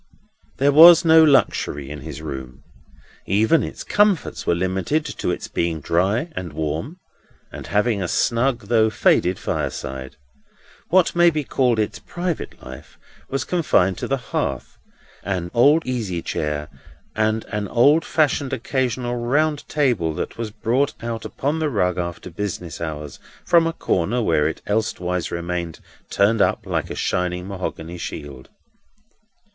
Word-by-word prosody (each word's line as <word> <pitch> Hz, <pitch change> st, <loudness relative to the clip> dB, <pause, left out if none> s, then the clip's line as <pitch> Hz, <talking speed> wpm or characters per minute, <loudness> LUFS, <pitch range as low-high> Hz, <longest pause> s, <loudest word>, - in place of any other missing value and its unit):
There 140 Hz, +2 st, +3 dB
was 170 Hz, +4 st, +9 dB
no 160 Hz, 0 st, +7 dB
luxury 75 Hz, -, +2 dB
in 75 Hz, -1 st, -7 dB
his 75 Hz, 0 st, -8 dB
room. 65 Hz, -4 st, -7 dB, 0.6 s
Even 110 Hz, -, +3 dB
its -, -, -6 dB
comforts 205 Hz, -4 st, +1 dB
were 85 Hz, -, +3 dB
limited 95 Hz, -, -1 dB
to -, -, -4 dB
its -, -, -3 dB
being 85 Hz, -1 st, -2 dB
dry 95 Hz, -, 0 dB
and 85 Hz, -4 st, -5 dB
warm, 80 Hz, -, -3 dB, 0.5 s
and -, -, -8 dB
having 105 Hz, 0 st, +1 dB
a 90 Hz, -, -1 dB
snug 120 Hz, +6 st, +1 dB
though 110 Hz, +1 st, +2 dB
faded 95 Hz, -3 st, +2 dB
fireside. 65 Hz, +1 st, -4 dB, 0.7 s
What 180 Hz, -1 st, +3 dB
may 175 Hz, 0 st, +6 dB
be 155 Hz, -2 st, -2 dB
called 125 Hz, -3 st, +1 dB
its 105 Hz, -1 st, -1 dB
private 175 Hz, -2 st, -5 dB
life 65 Hz, 0 st, -11 dB, 0.3 s
was 135 Hz, -1 st, -1 dB
confined 95 Hz, -, +1 dB
to -, -, -3 dB
the 135 Hz, -, 0 dB
hearth, 70 Hz, -, -4 dB, 0.4 s
and 90 Hz, -3 st, -3 dB
an 145 Hz, +7 st, +5 dB
easy 110 Hz, -9 st, -3 dB
chair, 75 Hz, 0 st, -3 dB, 0.5 s
and 110 Hz, 0 st, 0 dB
an 105 Hz, -2 st, -3 dB
old 140 Hz, -, +4 dB
fashioned 145 Hz, -3 st, 0 dB
occasional 125 Hz, -1 st, -2 dB
round 145 Hz, +5 st, 0 dB
table 120 Hz, -, +1 dB
that -, -, -4 dB
was 115 Hz, -1 st, -4 dB
brought 120 Hz, +6 st, 0 dB
out 115 Hz, -1 st, -4 dB
upon 145 Hz, +4 st, -2 dB
the 155 Hz, -1 st, 0 dB
rug 90 Hz, -7 st, 0 dB
after 85 Hz, +1 st, -5 dB
business 90 Hz, -2 st, -5 dB
hours, 75 Hz, -3 st, -6 dB, 0.3 s
from 170 Hz, -1 st, +4 dB
a 165 Hz, -, -2 dB
corner 100 Hz, -, 0 dB
where 80 Hz, -9 st, +2 dB
it 80 Hz, -, -5 dB
elsewise 90 Hz, -5 st, -1 dB
remained 85 Hz, -1 st, -4 dB, 0.3 s
turned 105 Hz, +2 st, +2 dB
up -, -, +1 dB
like -, -, -2 dB
a -, -, -5 dB
shining 90 Hz, 0 st, -2 dB
mahogany 90 Hz, -3 st, -6 dB
shield. 70 Hz, -5 st, -7 dB
105 Hz, 145 wpm, -22 LUFS, 85-135 Hz, 0.7 s, was